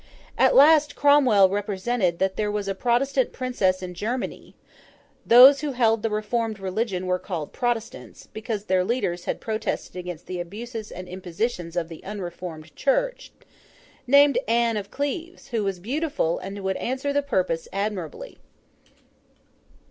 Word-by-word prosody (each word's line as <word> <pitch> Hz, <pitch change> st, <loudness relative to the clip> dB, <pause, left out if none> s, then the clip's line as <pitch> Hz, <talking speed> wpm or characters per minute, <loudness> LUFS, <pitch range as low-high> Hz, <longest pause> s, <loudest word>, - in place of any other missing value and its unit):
At -, -, +4 dB
last 295 Hz, 0 st, +6 dB
Cromwell 265 Hz, -9 st, +5 dB
represented 200 Hz, -1 st, -1 dB
that 190 Hz, +1 st, 0 dB
there 210 Hz, -1 st, -1 dB
was 205 Hz, -1 st, -3 dB
a 195 Hz, -, 0 dB
Protestant 250 Hz, +5 st, +1 dB
Princess 195 Hz, -8 st, 0 dB
in 180 Hz, -1 st, -6 dB
Germany—those 245 Hz, +4 st, +2 dB
who 295 Hz, -2 st, -2 dB
held 225 Hz, -3 st, +2 dB
the 225 Hz, -, -1 dB
reformed 215 Hz, 0 st, -2 dB
religion 190 Hz, 0 st, -2 dB
were 180 Hz, 0 st, 0 dB
called 170 Hz, -7 st, -5 dB
Protestants, 240 Hz, -2 st, -4 dB
because 220 Hz, -1 st, -4 dB
their 185 Hz, -3 st, +1 dB
leaders 185 Hz, -5 st, -2 dB
had -, -, -2 dB
Protested 220 Hz, -3 st, -3 dB
against 180 Hz, -2 st, -7 dB
the 180 Hz, -1 st, -5 dB
abuses 220 Hz, +5 st, -6 dB
and 185 Hz, 0 st, -8 dB
impositions 180 Hz, 0 st, -4 dB
of 170 Hz, -2 st, -1 dB
the 165 Hz, -1 st, -11 dB
unreformed 175 Hz, -5 st, -7 dB
Church—named 290 Hz, -, 0 dB
Anne 230 Hz, 0 st, +2 dB
of 200 Hz, -1 st, -4 dB
Cleves, 325 Hz, -, -5 dB
who 230 Hz, -3 st, -1 dB
was 195 Hz, -2 st, -2 dB
beautiful, 270 Hz, -, -1 dB
and 195 Hz, +1 st, -7 dB
would 190 Hz, 0 st, -1 dB
answer 265 Hz, +3 st, -2 dB
the 285 Hz, -, +2 dB
purpose 185 Hz, -11 st, -1 dB
admirably. 195 Hz, -5 st, -4 dB
215 Hz, 140 wpm, -24 LUFS, 185-250 Hz, -, last